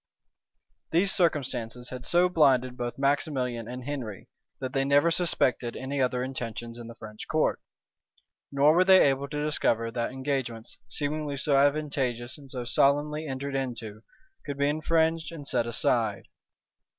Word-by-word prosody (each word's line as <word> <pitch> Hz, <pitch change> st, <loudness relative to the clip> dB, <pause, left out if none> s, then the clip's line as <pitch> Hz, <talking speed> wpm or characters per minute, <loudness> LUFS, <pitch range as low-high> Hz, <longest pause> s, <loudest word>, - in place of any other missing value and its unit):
These 185 Hz, +4 st, +3 dB
circumstances 125 Hz, -8 st, 0 dB
had 125 Hz, -1 st, -5 dB
so 175 Hz, +1 st, +4 dB
blinded 135 Hz, -7 st, +3 dB
both 120 Hz, -1 st, -4 dB
Maximilian 135 Hz, -4 st, 0 dB
and 125 Hz, +1 st, -6 dB
Henry, 125 Hz, -8 st, -6 dB, 0.3 s
that 130 Hz, -1 st, -5 dB
they 135 Hz, -1 st, +1 dB
never 145 Hz, +4 st, +4 dB
suspected 130 Hz, -8 st, +1 dB
any 135 Hz, +1 st, -3 dB
other 125 Hz, -1 st, +1 dB
intentions 120 Hz, -2 st, -6 dB
in 120 Hz, -, -8 dB
the 115 Hz, -, -10 dB
French 110 Hz, -2 st, -10 dB
court; -, -, +1 dB, 0.9 s
nor 145 Hz, +2 st, +5 dB
were 180 Hz, +2 st, +5 dB
they 190 Hz, -4 st, +7 dB
able 135 Hz, +1 st, 0 dB
to 150 Hz, 0 st, -3 dB
discover 115 Hz, -6 st, +1 dB
that 115 Hz, +1 st, -2 dB
engagements, 130 Hz, -5 st, -4 dB
seemingly 145 Hz, +2 st, -2 dB
so 140 Hz, +1 st, +1 dB
advantageous 135 Hz, -4 st, +1 dB
and 140 Hz, -2 st, -14 dB
so 125 Hz, -2 st, -5 dB
solemnly 145 Hz, +4 st, +2 dB
entered 140 Hz, +1 st, -4 dB
into, 115 Hz, -5 st, -4 dB, 0.4 s
could 140 Hz, -2 st, -5 dB
be 140 Hz, 0 st, +2 dB
infringed 160 Hz, +1 st, +1 dB
and 155 Hz, -4 st, -8 dB
set 120 Hz, -, +1 dB
aside. 115 Hz, -2 st, +1 dB
135 Hz, 150 wpm, -27 LUFS, 120-150 Hz, 0.9 s, they